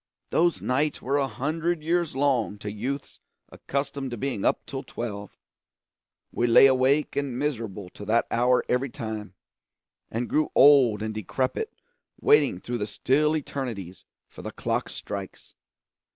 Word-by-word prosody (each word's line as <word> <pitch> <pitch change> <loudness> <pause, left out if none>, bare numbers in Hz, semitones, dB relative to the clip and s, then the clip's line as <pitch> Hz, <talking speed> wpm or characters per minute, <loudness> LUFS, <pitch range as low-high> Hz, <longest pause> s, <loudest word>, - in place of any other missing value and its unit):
Those 170 +1 +2
nights 145 +4 0
were 140 +3 0
a 135 - +1
hundred 155 +7 -2
years 170 -2 0
long 130 -7 +1
to 105 0 -6
youths 130 +7 -5 0.3
accustomed 140 -1 -3
to 120 - -5
being 120 -4 -2
up - - +1
till 135 -1 -5
twelve. 105 -6 -6 0.9
We 120 - 0
lay 120 +3 +8
awake 135 +3 +3
and 140 -4 -2
miserable 115 -9 -3
till 100 +3 -11
that 115 +2 +3
hour 125 +2 +3
every 125 +2 0
time, 110 -5 -6 0.7
and 120 +2 -2
grew 155 0 +1
old 130 -7 +6
and 110 0 -3
decrepit 130 - -2 0.5
waiting 440 +1 +4
through 120 0 -4
the 105 - -2
still 150 +9 +2
eternities 115 - -5 0.2
for - - -12
the - - -5
clock - - -2
strikes. 100 -1 -7
130 Hz, 145 wpm, -26 LUFS, 110-145 Hz, 0.9 s, lay